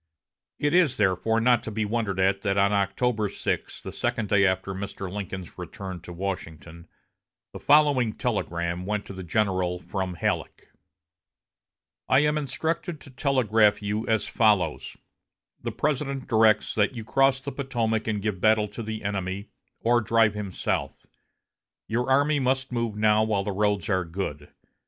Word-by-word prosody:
It 145 +1 0
is, 170 -7 +4
therefore, 105 +3 +2
not 120 +1 +4
to - - -6
be 110 0 -2
wondered 105 -3 -1
at 95 +1 +2
that 100 -1 0
on 100 +1 +3
October 105 +2 0
6, - - -3
the - - -6
second 105 -3 -2
day 100 -1 +4
after 95 +1 -1
Mr. 95 -1 -6
Lincoln's 95 -3 -6
return 95 -3 -7
to 90 - -10
Washington, 85 -2 -6 0.7
the - - -7
following 145 -7 +4
telegram 85 +1 -2
went 105 0 -2
to - - -8
the 95 - -7
general 95 -1 0
from 95 0 -4
Halleck: 85 - -3 1.4
"I 130 +2 +5
am 150 0 +2
instructed 160 +3 -2
to 140 - -13
telegraph 115 -7 +2
you 105 +2 -2
as 110 -2 +1
follows: 100 -8 +1 0.6
The - - -3
President 140 -2 -2
directs 110 -3 +3
that 105 +3 +1
you 115 - -5
cross 135 +4 +3
the 140 +1 -6
Potomac 115 -6 -1
and 105 -2 -1
give 105 -4 -2
battle 110 -1 +4
to 105 +3 -7
the 110 -1 -5
enemy, 100 0 -3 0.3
or 120 +1 +3
drive 115 -1 +3
him 105 -2 -5
south. - - -3 0.8
Your 120 +3 -1
army 145 +2 +3
must 130 0 0
move 115 -3 -2
now 105 0 +3
while 105 -3 0
the 105 - -2
roads 100 -3 0
are 95 -2 +1
good. 80 -4 -5
105 Hz, 160 wpm, -26 LUFS, 95-120 Hz, 1.4 s, I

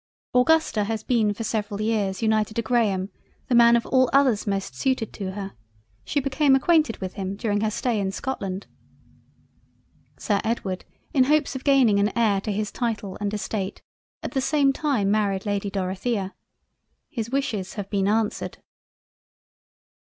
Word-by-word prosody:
Augusta 250 -4 +3
has 220 0 -3
been 225 -4 +2
for 205 +3 -5
several 210 -2 -2
years 215 -2 -1
united 215 -1 +1
to 230 - 0
Graham 210 -5 +1 0.4
the - - +1
Man 235 0 +7
of 235 - +1
all 260 -1 +3
others 260 -7 +3
most 195 -7 -2
suited 230 - -1
to 190 -2 -5
her; 195 -1 -6 0.5
she 290 - 0
became 275 +1 +3
acquainted 305 -3 +3
with 185 -1 -5
him 195 -1 -4
during 205 -1 -1
her 220 - +1
stay 225 +1 -1
in 190 -1 -1
Scotland. 195 -5 -4 1.5
Sir 205 -2 0
Edward 205 -5 -2 0.3
in 260 -3 +4
hopes 300 0 +2
of 265 - -5
gaining 260 -8 +4
an 205 +1 +2
Heir 210 -4 +3
to 215 - -3
his 210 +1 -2
Title 220 -5 -3
and 205 -1 -1
Estate, 210 -2 -4 0.4
at - - -4
the 265 - 0
same 275 0 +3
time 265 -10 0
married 200 -2 0
Lady 205 -1 -1
Dorothea—. 195 +1 -2 0.8
His 225 -1 -3
wishes 235 -8 -2
have 205 -2 -4
been 195 -2 +1
answered. 215 0 -1
215 Hz, 160 wpm, -24 LUFS, 200-250 Hz, 1.5 s, Man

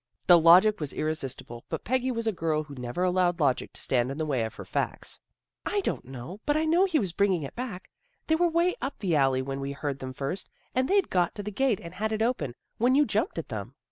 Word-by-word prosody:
" - - -47
The 175 -1 +8
logic 180 +6 +7
was 150 -3 -4
irresistible, 135 -6 -4
but - - -4
Peggy 255 +2 0
was 230 -2 -2
a 220 - +2
girl 160 -4 -1
who 145 -2 -11
never 125 +6 -3
allowed 180 -1 +2
logic 140 -5 +1
to - - -10
stand 125 -1 +1
in 135 - -5
the 155 - -1
way 135 -6 0
of 110 0 -5
her - - -8
facts. - - -2 0.2
" - - -64
I 410 - +1
don't 370 - -2
know. 130 - -8
But 295 +1 +3
I 315 - +1
know 340 +4 +4
he 355 -5 +1
was 195 - 0
bring 200 +3 +2
ing 170 -4 -1
it 135 - -6
back. 230 -7 -5 0.4
They 320 - +1
were 345 +1 +3
way 340 +2 +2
up 270 +3 -3
the 185 -6 0
alley 135 -2 +3
when 135 +1 -4
we 140 0 -3
heard 140 -1 -3
them 130 -1 -6
first, 140 +9 -4 0.2
and 255 +1 +1
they'd 395 -1 +2
got 175 -2 +1
to 205 - -5
the 210 - -4
gate 245 -1 +1
and 170 0 -9
had 215 +4 -2
it 220 0 0
open, 155 - -1 0.2
when 245 +3 +4
you 295 +1 +5
jumped 220 - -1
at - - -4
them." - - -6
180 Hz, 265 wpm, -28 LUFS, -, 0.4 s, The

